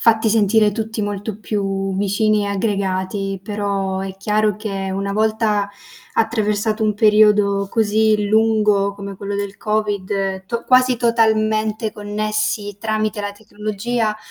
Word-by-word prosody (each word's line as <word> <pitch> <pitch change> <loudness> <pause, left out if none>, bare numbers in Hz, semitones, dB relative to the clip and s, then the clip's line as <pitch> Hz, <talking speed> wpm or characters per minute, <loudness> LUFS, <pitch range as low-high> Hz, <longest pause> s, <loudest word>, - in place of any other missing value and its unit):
fatti 225 -1 +3
sentire 215 0 +3
tutti 220 0 -3
molto 205 +1 -4
più 195 -2 -2
vicini 205 +1 +1
e - - -2
aggregati. 195 -1 -2
Però 200 -2 -2
è 190 0 -5
chiaro 210 +1 +1
che 195 -3 -4
una 200 +1 -2
volta 215 -1 +1 0.5
attraversato 220 -1 0
un 215 -1 +2
periodo 210 -2 +4
così 215 -1 +2
lungo 210 -2 +3
come 200 0 -7
quello 200 +1 -4
del 200 0 -4
Covid, 200 -3 -2
to 235 +2 -3
quasi 255 -1 +4
totalmente 220 -2 +1
connessi 210 -1 -2
tramite 215 0 -1
la 205 0 -3
tecnologia, 215 +2 -3
210 Hz, 125 wpm, -19 LUFS, 200-220 Hz, 0.5 s, periodo